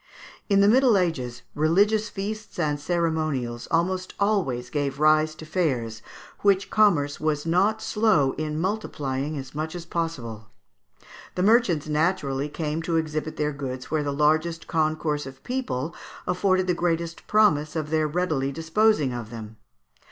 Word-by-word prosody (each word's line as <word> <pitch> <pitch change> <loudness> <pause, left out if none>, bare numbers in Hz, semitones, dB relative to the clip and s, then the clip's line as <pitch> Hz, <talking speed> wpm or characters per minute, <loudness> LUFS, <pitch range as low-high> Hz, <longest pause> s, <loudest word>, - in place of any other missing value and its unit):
In 200 -1 +5
the 200 - +5
Middle 245 -1 +5
Ages 130 -10 -2
religious 205 +8 +2
feasts 210 +2 -6
and 150 -1 0
ceremonials 155 -7 -1
almost 185 +2 0
always 175 - 0
gave 140 -2 -2
rise 155 0 +4
to 160 - -10
fairs, 130 -10 -1 0.4
which 200 -1 +2
commerce 170 -10 +3
was 155 -1 -1
not 195 +6 +2
slow 210 -11 +3
in 155 +1 -3
multiplying 150 -7 -2
as 135 -1 -7
much 155 +3 -4
as 170 -1 -6
possible. 125 -11 -4 0.9
The 180 - 0
merchants 200 -8 +3
naturally 150 -3 0
came 155 +1 -3
to 165 0 -1
exhibit 155 -1 -2
their 150 0 0
goods 130 -2 -6
where 155 -1 +1
the 145 -1 -2
largest 155 +3 +1
concourse 155 -2 0
of 130 0 -12
people 170 - -3 0.3
afforded 185 +1 +2
the 180 - +1
greatest 170 -1 -2
promise 155 -8 +3
of 155 -1 -3
their 155 -1 +2
readily 150 -4 0
disposing 165 - +2
of 120 -3 -5
them. 110 -1 -9
155 Hz, 145 wpm, -25 LUFS, 145-185 Hz, 0.9 s, In